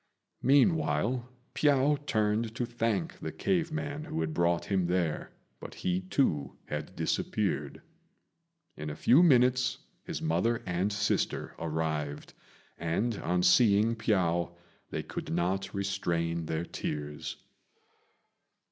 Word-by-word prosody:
Meanwhile, 135 -3 +3 0.2
Piao 145 0 +3
turned 110 +1 +1
to 120 - -1
thank 120 +8 -1
the - - -4
cave 170 -4 0
man 145 0 -4
who 80 - -3
had 80 -1 -2
brought 85 0 +1
him 95 -3 +1
there, 90 -3 -1 0.3
but - - -9
he, 90 0 -1
too, 90 - 0
had - - -5
disappeared. - - -1 0.9
In 75 0 -5
a 75 - -5
few 135 +7 +5
minutes 125 -5 +4 0.3
his - - -4
mother 90 +9 0
and 90 +3 0
sister 100 0 -1
arrived, 75 -2 -3 0.5
and, 95 +8 0
on 90 +1 0
seeing 105 +3 +5
Piao, 85 -6 +1 0.3
they - - -3
could - - -6
not 90 +3 0
restrain 85 -4 -1
their 80 +1 -2
tears. 75 -3 -4
100 Hz, 120 wpm, -30 LUFS, 85-125 Hz, 0.9 s, few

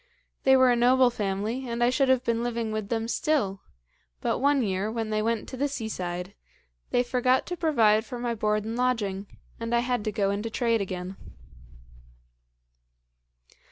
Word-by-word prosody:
They 265 0 +7
were 260 -1 +5
a - - +3
noble 250 +1 +4
family; 215 +4 -3
and 235 +1 -1
I 240 - +4
should 270 0 +2
have 260 -1 +3
been 230 -2 0
living 235 -2 -2
with 215 -2 -3
them 225 -1 -1
still, 230 -8 0 0.6
but - - -1
one 280 -1 +3
year, 195 0 -1
when 225 -1 -3
they 215 0 +1
went 225 0 -1
to 260 - -7
the 285 +3 +1
seaside, 185 -8 -4 0.6
they 245 - +2
forgot 255 +1 +1
to 355 - -4
provide 230 -11 +3
for 245 +1 -7
my 240 -1 -2
board 210 -1 0
and 225 +1 -3
lodging, 210 -6 -1 0.3
and 230 +1 -1
I 235 - +3
had 245 -3 -1
to 215 - 0
go 200 -1 0
into 205 +3 -3
trade 230 -1 +1
again. 185 0 -5
230 Hz, 175 wpm, -27 LUFS, 210-250 Hz, 0.6 s, They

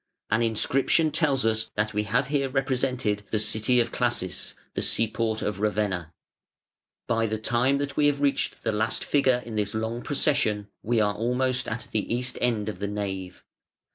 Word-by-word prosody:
An 110 +2 +3
inscription 135 +7 +2
tells 140 -6 +1
us 110 0 +1
that 110 +1 0
we 105 0 0
have 125 +6 +1
here 140 -2 +1
represented 130 -5 0
the 110 - 0
city 110 +3 +2
of 120 - +1
Classis, - - -1 0.2
the - - -2
seaport 110 0 +1
of 105 -2 -2
Ravenna. 105 -6 -1 0.9
By 115 0 +1
the 110 0 -1
time 120 +5 +1
that 140 0 -3
we 145 - +4
have 145 -1 +1
reached 140 -1 0
the - - +1
last 110 +1 0
figure 130 -4 +2
in 115 -2 -5
this 105 0 -1
long 110 +2 -2
procession 125 -8 +1
we 115 +1 +1
are 105 -1 +2
almost 125 +3 0
at 110 +1 -3
the 110 0 -2
east 125 +2 0
end 110 -4 +1
of 105 -4 -4
the 100 - -2
nave. 95 -3 -4
115 Hz, 175 wpm, -26 LUFS, 105-130 Hz, 0.9 s, we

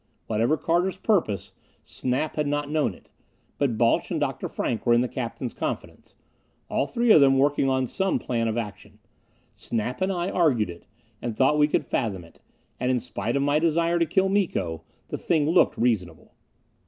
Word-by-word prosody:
Whatever 115 +8 +1
Carter's 175 +4 0
purpose, 180 - 0 0.3
Snap 130 +5 -2
had 150 -1 0
not 145 0 -2
known 150 - 0
it. - - -22 0.5
But 130 -6 +1
Balch 115 0 +2
and - - -1
Dr. - - -2
Frank 115 -4 -2
were 120 - +4
in 120 - +4
the 125 - 0
captain's 120 0 -5
confidence - - -6 0.6
all 140 - +1
three 235 -2 +2
of 155 - +8
them 135 -1 +5
working 140 0 +2
on 130 -1 +1
some 190 +10 0
plan 115 -2 -1
of 110 +1 -1
action. 105 -4 -6 0.6
Snap 120 - -4
and 190 +1 +1
I 180 0 -2
argued 125 - +2
it, 85 - -14 0.3
and 115 -3 -4
thought 145 +3 +3
we 150 - +5
could - - 0
fathom 100 -8 -2
it; 85 - -19 0.4
and 125 - 0
in 130 -1 +2
spite 115 -1 -3
of 140 - +1
my 145 +1 +2
desire 170 +1 +2
to 170 - +2
kill 190 +3 +2
Miko, 130 - -1 0.3
the - - -4
thing 155 -4 +1
looked 170 +3 +3
reasonable. 95 -9 -1
135 Hz, 185 wpm, -25 LUFS, 115-160 Hz, 0.6 s, of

